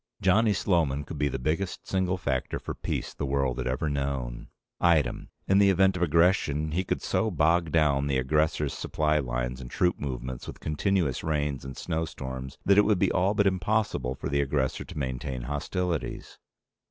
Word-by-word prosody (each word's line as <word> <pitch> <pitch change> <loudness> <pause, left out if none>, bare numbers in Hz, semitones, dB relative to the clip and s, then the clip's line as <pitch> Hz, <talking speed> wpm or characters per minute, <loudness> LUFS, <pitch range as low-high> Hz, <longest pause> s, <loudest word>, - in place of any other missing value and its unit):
Johnny 105 +4 +4
Sloman 80 -8 +1
could - - -7
be 75 - +2
the 70 - -2
biggest 80 +8 -2
single 95 -1 0
factor 70 -8 -2
for - - -5
peace - - -4
the - - -5
world 65 -2 0
had 65 - -2
ever 65 +5 -1
known. 70 -4 -3 0.3
Item. 80 -7 +2 0.2
In 95 +1 +4
the 100 -1 +6
event 95 0 +4
of 90 - -4
aggression, 80 -2 +2
he 90 +4 0
could - - -2
so 110 - +1
bog 85 -1 +2
down 70 -3 +3
the 70 -2 +1
aggressor's 75 +2 +1
supply 75 0 0
lines 60 -1 -3
and - - -8
troop 90 +6 +1
movements 65 -2 -5
with - - -8
continuous 80 -3 0
rains 75 -3 -1
and 65 -1 -8
snowstorms 65 -6 -4
that 100 +1 +6
it - - +6
would 105 -2 +3
be 95 0 +2
all 95 +4 +2
but 100 -1 +3
impossible 95 - 0
for - - -5
the 70 0 +1
aggressor 70 -1 -1
to - - -10
maintain 65 -2 -3
hostilities. 80 +5 -3
75 Hz, 180 wpm, -27 LUFS, 65-90 Hz, 0.3 s, the